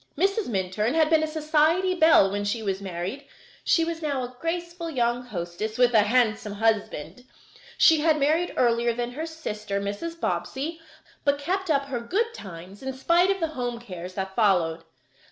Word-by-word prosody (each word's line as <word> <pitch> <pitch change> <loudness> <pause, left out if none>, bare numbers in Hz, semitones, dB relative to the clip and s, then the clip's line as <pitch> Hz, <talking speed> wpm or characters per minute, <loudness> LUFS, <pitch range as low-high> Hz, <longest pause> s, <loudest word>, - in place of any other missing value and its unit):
Mrs. 395 +5 +1
Minturn 210 +4 -1
had 320 -1 +3
been 320 -1 +5
a 315 - 0
society 315 +4 +2
belle 315 - +5
when 205 0 -2
she 210 +2 -2
was 195 -1 -2
married. 190 +9 -5 0.4
She 330 - +3
was 335 0 -4
now 285 -4 -1
a 250 +1 -7
graceful 340 0 -3
young 240 -4 0
hostess, 195 +1 -5
with 245 -1 +4
a 220 - +7
handsome 215 -1 +1
husband. 220 -1 -1 0.5
She 320 -2 +6
had 310 0 +3
married 315 +5 +1
earlier 235 -1 +2
than 240 +1 -3
her 310 +6 -5
sister, 210 -11 -4
Mrs. 205 +13 -5
Bobbsey, 320 +1 -3 0.4
but 285 0 +2
kept 370 +5 -2
up 280 -2 +2
her 270 -3 -3
good 425 - -1
times 190 - -10
in 265 0 -4
spite 340 +8 +3
of 390 0 +1
the 325 -2 -1
home 245 -5 -4
cares 185 -5 -8
that 190 -1 -4
followed. 175 -7 +2
250 Hz, 175 wpm, -25 LUFS, 205-320 Hz, 0.5 s, a